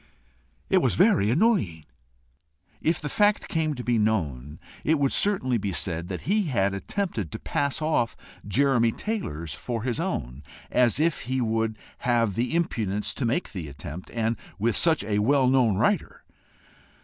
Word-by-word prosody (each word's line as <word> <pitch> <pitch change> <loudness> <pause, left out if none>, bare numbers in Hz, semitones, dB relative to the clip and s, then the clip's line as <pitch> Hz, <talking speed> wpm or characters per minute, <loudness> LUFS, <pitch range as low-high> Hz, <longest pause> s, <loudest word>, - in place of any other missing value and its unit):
It - - +4
was - - +1
very 100 +1 +4
annoying. 120 - +1 1.0
If 160 +1 +1
the 150 - -4
fact 205 +6 +2
came 155 -2 -1
to 125 - -6
be 120 -2 +1
known, 75 - -1 0.2
it 160 +1 +3
would 140 -2 +1
certainly 130 - +2
be 100 -1 -2
said 85 +1 -2
that 90 -1 -5
he 205 +2 +1
had 100 - +1
attempted 110 - -3
to - - -4
pass 140 +2 -1
off 135 -7 +1 0.3
Jeremy 120 0 +3
Taylor's 85 - -4
for 115 - -4
his 125 +2 -2
own 70 - -3 0.3
as 125 0 +3
if 165 0 +2
he 130 0 0
would 110 -2 0 0.2
have 115 -4 +1
the 120 - -1
impudence 105 - -1
to 135 - -2
make 125 +10 -1
the 90 -6 -6
attempt, 75 +5 -8
and 115 0 0 0.2
with 110 +1 +1
such 160 -7 +3
a 105 0 0
well 130 +4 +3
known 125 -5 +3
writer! - - 0
115 Hz, 160 wpm, -26 LUFS, 100-145 Hz, 1.0 s, It